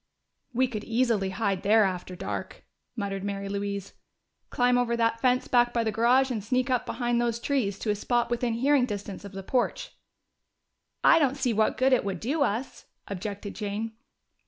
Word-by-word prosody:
"We 255 +1 +2
could 215 -4 -5
easily 225 -4 +1
hide 195 -1 -1
there 215 +2 +5
after 185 -1 -2
dark," - - -5 0.3
muttered 200 -3 -3
Mary 200 -1 -3
Louise. 200 0 -4 0.6
"Climb 245 0 +2
over 240 -1 +1
that 230 0 +1
fence 255 0 +2
back 240 -1 +3
by 235 - +2
the 220 - 0
garage 250 +4 +3
and 220 -5 -3
sneak 255 +4 0
up 250 -2 0
behind 240 -1 0
those 235 -1 0
trees 235 -7 0
to 215 - -1
a - - 0
spot 240 +3 0
within 240 -1 0
hearing 260 +2 +3
distance 205 -3 -6
of 200 -1 -9
the 195 0 -6
porch." 265 - -1 1.1
"I 330 - +7
don't 280 -2 +1
see 260 -4 +1
what 220 0 +1
good 260 +1 +3
it 255 - +3
would 195 -3 -3
do 285 - -1
us," 245 0 -1 0.2
objected 200 +1 -5
Jane. 215 +1 -3
230 Hz, 180 wpm, -27 LUFS, 200-250 Hz, 1.1 s, I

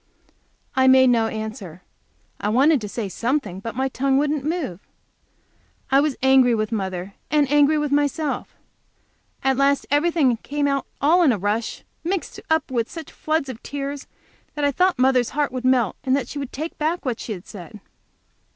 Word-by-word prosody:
I 260 0 +4
made 260 -1 +6
no 225 -2 +2
answer. 215 -6 -6 0.6
I 210 - -1
wanted 270 +5 +4
to 210 - -5
say 215 0 -3
something, 230 -2 -2
but 230 +3 -6
my 265 +2 0
tongue 270 +1 0
wouldn't 295 0 0
move. 305 - -3 1.1
I 270 - +6
was 290 -2 +1
angry 265 -2 +5
with 215 0 -2
mother, 190 -3 -3 0.2
and 295 -2 +3
angry 295 +1 +4
with 295 -1 -1
myself. 290 +1 -1 0.9
At 265 -1 +2
last 275 0 +2
everything 290 -5 +3
came 285 +5 -2
out 275 -1 -1
all 325 +6 +4
in 310 -6 +5
a 225 - 0
rush, 205 +4 -2 0.2
mixed 355 -1 -3
up 320 -3 +1
with 235 -3 -1
such 325 -3 -8
floods 310 -2 -1
of 250 -3 -7
tears 280 0 -5 0.5
that 295 -1 0
I 285 - +3
thought 365 +5 +2
mother's 255 -2 +3
heart 295 -3 +1
would 255 0 -5
melt, 255 -5 +2
and 260 -1 +2
that 270 -4 -2
she 290 - -6
would 275 -3 -5
take 315 +4 -6
back 315 +2 -1
what 245 -3 -2
she 220 - -4
had 180 -2 -10
said. 205 +2 -10
265 Hz, 180 wpm, -22 LUFS, 230-290 Hz, 1.1 s, made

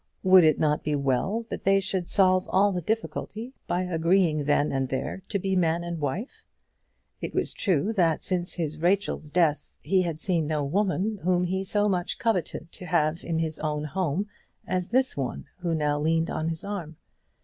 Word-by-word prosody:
Would 185 -1 +7
it 155 -2 +4
not 150 -1 +1
be 150 0 0
well 140 - 0
that - - -5
they 195 0 +4
should 190 -2 -2
solve 185 -2 +3
all 200 +2 +4
the 180 -2 -2
difficulty 220 +4 -3
by 180 +1 0
agreeing 165 -3 +2
then 145 0 +2
and 135 -1 -1
there 135 +8 -3
to 205 - 0
be 190 0 -1
man 170 -1 +2
and 170 -1 -4
wife? 155 - -4 0.8
It - - -5
was - - 0
true 190 +1 +1
that 170 -6 +2
since 180 -2 -2
his 155 -3 -3
Rachel's 180 -3 0
death 155 -2 +1
he 190 -1 +2
had 165 -3 -3
seen 165 -3 0
no 150 -1 0
woman 200 +5 0
whom 180 +1 +2
he 190 +2 -1
so 205 +2 +1
much 180 -3 -1
coveted 180 -6 -1
to 180 - -9
have 160 -1 +1
in 165 -1 -2
his 160 -1 -2
home 155 +4 -1 0.4
as 185 -1 -2
this 260 +2 +2
one 135 -3 -3
who 170 -2 -1
now 150 -1 0
leaned 165 +2 +1
on 155 +1 -1
his 160 -1 -4
arm. 175 -7 -5
175 Hz, 185 wpm, -26 LUFS, 155-190 Hz, 0.8 s, Would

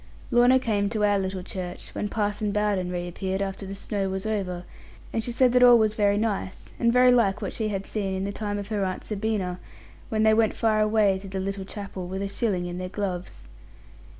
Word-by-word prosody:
Lorna 245 +2 +6
came 210 -5 0
to 215 -1 -1
our 205 -1 +3
little 190 -1 -3
church, 180 -1 -7
when 205 - -3
Parson 205 -1 -1
Bowden 205 -3 0
reappeared 180 +2 -3
after 195 0 -4
the 195 - -6
snow 195 -1 -2
was 190 +1 -3
over; 190 -5 -2 0.5
and 225 - -1
she 240 - -3
said 250 +1 +4
that 250 0 +4
all 245 -1 +9
was 215 -2 +2
very 205 -1 +2
nice, 205 -3 -2
and 235 -1 +3
very 250 +1 +6
like 210 -5 +3
what 205 - -4
she 220 - -1
had 195 -2 -3
seen 195 -3 -2
in 190 - -2
the 200 - -2
time 205 0 -3
of 200 0 -6
her 210 -3 0
Aunt 185 -1 -3
Sabina, 200 -4 -2 0.5
when 215 -1 +1
they 220 0 +5
went 220 0 +3
far 215 -1 +2
away 210 -3 +3
to 195 - -9
the 190 0 -4
little 195 0 -3
chapel, 195 -3 -6
with 190 +2 -4
a - - -1
shilling 195 -3 -1
in 175 0 -5
their 185 0 -4
gloves. 185 -3 -5
200 Hz, 220 wpm, -26 LUFS, 190-220 Hz, 0.5 s, all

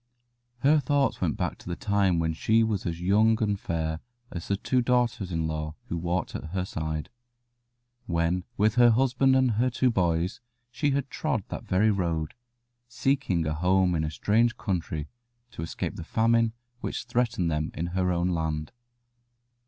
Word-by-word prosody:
Her 150 +3 +5
thoughts 140 0 +1
went - - 0
back - - -2
to - - -10
the 85 - -2
time 100 -3 +1
when 80 0 0
she 110 +7 +3
was 105 -5 -1
as 85 0 -3
young 110 +4 +4
and 105 -2 0
fair 80 -2 -2 0.3
as 85 - -6
the 100 - 0
two 130 +5 +1
daughters 120 -5 +1
in 80 -2 -1
law 75 0 -4
who 85 - -2
walked 85 +1 -2
at - - -5
her 90 -1 0
side 80 -1 -4 1.0
when 85 +1 0
with 105 +1 +3
her 120 - +8
husband 130 +2 +3
and 130 -2 +3
her 120 +4 +2
two 125 +1 +2
boys 90 -1 0 0.3
she 145 +4 0
had 140 0 -1
trod 135 -10 -1
that - - -6
very 105 +4 +3
road, 85 -5 -1 0.5
seeking 125 - 0
a 75 - 0
home 90 +3 +2
in 80 -2 0
a 80 - -1
strange 115 +9 +1
country 80 -7 -3 0.4
to - - -8
escape 80 - -4
the - - -6
famine 115 +4 +2 0.3
which - - -4
threatened 115 -8 0
them 75 0 -1
in 80 - -2
her 90 -1 +1
own 85 +1 +1
land. 80 -3 -2
95 Hz, 175 wpm, -27 LUFS, 85-115 Hz, 1.0 s, her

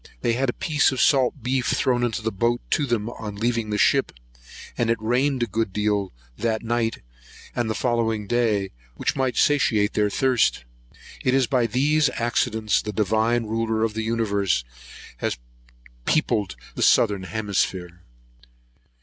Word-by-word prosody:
They 115 - +1
had 130 +2 0
a - - -1
piece 155 -6 +2
of 130 - -3
salt 130 -1 +3
beef 130 0 0
thrown 125 -2 +1
into 115 -2 -1
the 110 - -1
boat 120 +4 0
to 145 - +1
them 115 -3 -1
on 110 -3 -6
leaving 115 +1 -1
the 105 - -1
ship; - - +3 0.6
and 115 - 0
it 115 - +2
rained 125 +4 +1
a - - +2
good 110 -1 -2
deal 105 -1 0 0.3
that 110 -1 -1
night 115 0 -1 0.5
and 120 -2 -1
the 110 - -1
following 115 -3 0
day, 110 -4 0 0.2
which - - -1
might 130 -3 -1
satiate 115 -8 +2
their 105 -1 +2
thirst. 125 - +1 0.6
It 130 - +2
is 135 -1 +3
by 125 -1 +1
these 145 +6 +2
accidents 110 -2 0
the 105 - -5
Divine 110 +3 +1
Ruler 110 0 -1
of 115 -1 0
the 110 - -3
universe 105 - 0 0.5
has - - -2 0.7
peopled 100 -3 +1 0.2
the - - -6
southern 105 -4 +4
hemisphere. 95 -4 -2
115 Hz, 160 wpm, -23 LUFS, 105-120 Hz, 0.7 s, southern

